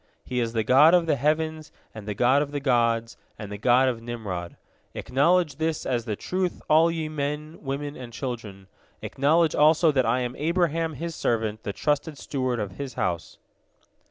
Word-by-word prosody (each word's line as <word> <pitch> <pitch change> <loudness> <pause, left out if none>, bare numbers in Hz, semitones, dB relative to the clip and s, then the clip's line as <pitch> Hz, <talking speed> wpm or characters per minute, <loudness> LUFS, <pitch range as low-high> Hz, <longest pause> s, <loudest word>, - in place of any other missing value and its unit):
He 125 - -2
is 115 -1 -1
the 110 -1 0
God 145 +9 +6
of 175 -2 +3
the 160 - +2
heavens, 155 +2 -1 0.2
and 110 -2 -10
the 105 - -3
God 130 +6 +3
of 145 - -2
the 145 - -2
gods, 115 -4 +1 0.2
and 105 -1 -8
the 105 - -5
God 125 +4 +4
of 120 -3 -2
Nimrod. 105 -7 -6 0.4
Acknowledge 150 +1 +1
this 160 0 -2
as 120 -3 -1
the 110 -3 -2
truth, 185 - -2
all 160 +2 +5
ye 165 -2 -3
men, 150 +1 -4
women, 145 +1 -4
and 125 -2 -9
children. 115 -6 -6 0.4
Acknowledge 155 +4 +2
also 155 +2 +4
that 130 -4 +1
I 120 +3 +1
am 125 0 -3
Abraham 165 0 0
His 165 +4 -5
servant, 110 -6 -1
the 100 - -4
trusted 145 - -1
steward 130 -4 -2
of 100 -3 -5
His 140 -3 -5
house." 85 -3 -3
135 Hz, 185 wpm, -25 LUFS, 115-155 Hz, 0.4 s, God